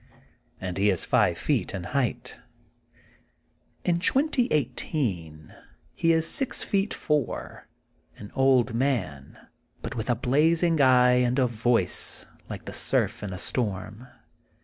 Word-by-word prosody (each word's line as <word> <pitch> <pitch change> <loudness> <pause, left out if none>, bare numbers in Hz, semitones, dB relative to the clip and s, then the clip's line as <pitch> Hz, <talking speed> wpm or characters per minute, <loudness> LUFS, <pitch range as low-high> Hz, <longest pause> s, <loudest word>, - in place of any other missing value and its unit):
And 90 0 -5
he 100 +1 +3
is 95 -4 +2
five - - +2
feet - - -1
in 95 - -5
height. 125 +4 -3 1.5
In 170 -1 +1
2018 135 - -1 0.4
he 165 - +1
is 160 0 +2
six 270 +7 +1
feet 200 0 0
four, 150 -5 -3 0.5
an 100 - -10
T>ld 130 -2 +2
man, 110 - -2 0.5
but - - -5
with 110 +2 -4
a 120 - +3
blazing 160 +6 +2
eye 125 -1 +5
and 125 +1 0
a 130 - +3
voice 115 -5 +1 0.2
like - - -7
the - - -7
surf - - 0
in 105 -2 -5
a 90 - -6
storm. 105 +2 -3
125 Hz, 125 wpm, -26 LUFS, 105-150 Hz, 1.5 s, eye